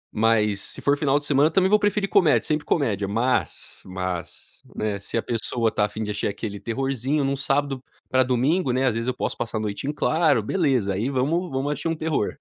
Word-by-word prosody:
mas 105 -2 +2
se - - -5
for 145 0 +3
final 145 -1 +2
de 145 - -9
semana 145 +2 +4
também 185 +3 +3
vou 210 +1 +5
preferir 205 0 +1
comédia, 155 - +4
sempre 150 -1 -1
comédia, 105 - 0
mas 115 +5 -1
mas, 90 -2 -6
né, 105 -2 -2
se 110 - -4
a - - 0
pessoa 115 0 -1
está 105 -1 +1
afim 110 +1 -5
de 105 - -3
assistir 105 - -2
aquele 100 0 -5
terrorzinho 135 +5 -1
em - - +1
um 140 - 0
sábado 135 -1 -1 0.3
para 130 0 +3
domingo, 130 +5 +1
né, 130 +2 +1
às 125 - +2
vezes 115 +1 -2
eu 130 - +1
posso - - -2
passar 115 -1 -3
a 110 - -2
noite 105 +6 -4
em - - +1
claro, 155 -7 +2
beleza, 130 - +1
aí 110 +8 -1
vamos 155 +7 0
vamos 135 +2 -1
assistir 155 - -3
um 165 - 0
terror. 155 -8 -1
130 Hz, 220 wpm, -24 LUFS, 110-145 Hz, 0.3 s, vou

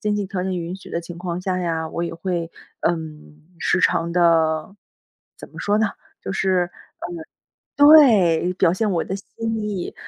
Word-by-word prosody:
经 210 0 0
济 205 - -1
条 190 -2 -4
件 185 -1 -2
允 170 +2 -5
许 190 - -11
的 170 - -3
情 170 0 -9
况 175 -1 -4
下 185 0 -2
呀， 165 -2 -2
我 170 - -3
也 170 - -4
会， 170 -1 -3 0.4
嗯， 155 -2 -6 0.2
时 - - +1
常 170 -1 +2
地， 165 0 +2 0.6
怎 - - -11
么 - - -13
说 205 0 +1
呢？ 220 0 +2 0.4
就 - - -4
是 185 -2 +1 1.1
嗯， 285 - +7
对， 205 - +6
表 170 -2 +3
现 210 +3 0
我 170 -3 0
的 190 - -4
心 225 +3 -5
意。 205 -4 -4
180 Hz, 190 characters per minute, -22 LUFS, 170-195 Hz, 1.1 s, 嗯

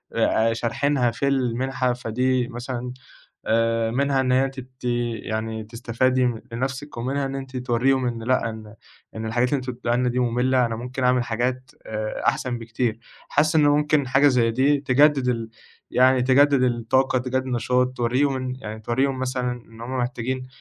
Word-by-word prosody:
آآ 115 +1 +2
شارحينها 120 +2 0
في 115 +4 -2
المنحة؟ 130 -1 0
فدي 125 +1 0
مثلًا 125 0 -5 0.6
آآ 115 0 +2
منها 135 +2 +1
إن 130 -1 0
هي 130 +1 +3
تت 130 -1 -10 0.5
يعني 110 +1 -3
تستفادي 125 +3 0 0.2
لنفسِك، 135 +4 -4
ومنها 135 +4 -1
إن 135 0 -4
أنتِ 135 -1 -6
توريهم 125 +1 +1
إن 115 -2 -4
لأ 125 -1 +1
إن، 110 -1 -10 0.4
إن 110 0 -4
الحاجات 120 +3 +1
اللي 145 - +1
أنتم 130 0 -4
بتدوها 120 0 -1
لنا 125 0 +1
دي 125 +1 -1
مُمِلة، 125 +1 +2
أنا 115 -1 -3
ممكن 125 +3 -5
اعمل 125 -1 +3
حاجات 125 +2 -2
آآ 110 0 -4
أحسن 125 -2 0
بكتير 115 0 -2 0.3
حاسة 155 +2 +2
إن - - +4
ممكن 150 -1 +2
حاجة 135 +3 +4
زي 120 -4 +3
دي 135 +5 +3
تجدد 140 0 +3
ال 115 -2 -2 0.4
يعني 130 0 +4
تجدد 135 +1 +4
الطاقة 125 +2 +1
تجدد 130 +1 -2
نشاط، 125 +1 +1
توريهم 130 +4 +1
إن 130 -1 -3
يعني 110 -1 -6
توريهم 130 +4 0
مثلًا 125 -1 -1
إن 115 -2 -10
هُم 130 +2 -4
محتاجين 125 +1 -3
125 Hz, 165 wpm, -23 LUFS, 115-130 Hz, 0.6 s, إن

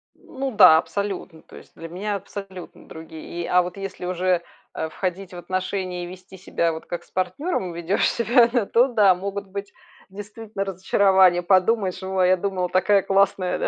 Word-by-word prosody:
Ну 270 0 -6
да, 185 -8 +8
абсолютно. 165 0 -4
То - - -17
есть, - - -15
для 165 - -9
меня 200 +4 -3
абсолютно 195 -1 -9
другие. 160 0 -10 0.2
И - - -4
а 180 - +4
вот 180 +1 -6
если 195 -2 -6
уже, 180 0 0 0.3
э, 160 - -3
входить 185 +3 -5
в 175 - -8
отношения 185 0 -3
и - - -6
вести 185 +1 -12
себя, 170 -2 -1
вот 160 0 -8
как 175 - -6
с - - -27
партнёром 185 - -2
ведёшь 170 +3 0
себя, 235 +1 +3 0.2
то 240 +6 +3
да, 205 -6 +4
могут 200 +2 -5
быть, 200 +1 -7 0.4
действительно, 205 +1 -7
разочарования. 190 -1 +3
Подумаешь: 185 +1 +1
"О, 190 0 -3
а 180 - +4
я 185 0 +4
думала, 185 -1 -2
такая 195 +2 +3
классная, 195 -1 +1
да, - - -1
185 Hz, 180 wpm, -23 LUFS, 180-200 Hz, 0.4 s, да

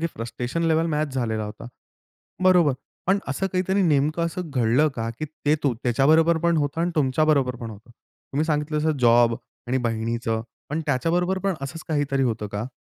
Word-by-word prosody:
की 165 - +1
frustration 120 +7 -4
level 165 0 +2
match 150 -3 -1
झालेला 110 -4 -1
होता. 105 +2 -8 0.8
बरोबर. 180 -6 +5 0.3
पण 195 +2 +3
असं 195 +8 -1
काहीतरी 190 +2 +1
नेमकं 155 0 +2
असं 170 0 -5
घडलं 125 +3 +3
का? 115 0 -2
की 155 - -2
ते 150 0 -1
तू 135 -5 +1
त्याच्याबरोबर 155 +7 +4
पण 170 0 +2
होतं 145 +2 -1
आणि 175 +1 +1
तुमच्याबरोबर 135 -2 +2
पण 115 -1 -7
होतं. 110 +3 -13
तुम्ही 140 +5 -6
सांगितलं 150 0 0
तसं 155 -1 +1
जॉब 120 -1 +5 0.3
आणि 130 +1 +1
बहिणीचं, 115 0 -1 0.3
पण 155 +2 -1
त्याच्याबरोबर 175 +7 +1
पण 195 -2 +1
असंच 160 +4 -6
काहीतरी 145 -3 0
होतं 110 -4 -1
का? 105 +4 -3
145 Hz, 175 wpm, -24 LUFS, 120-165 Hz, 0.8 s, बरोबर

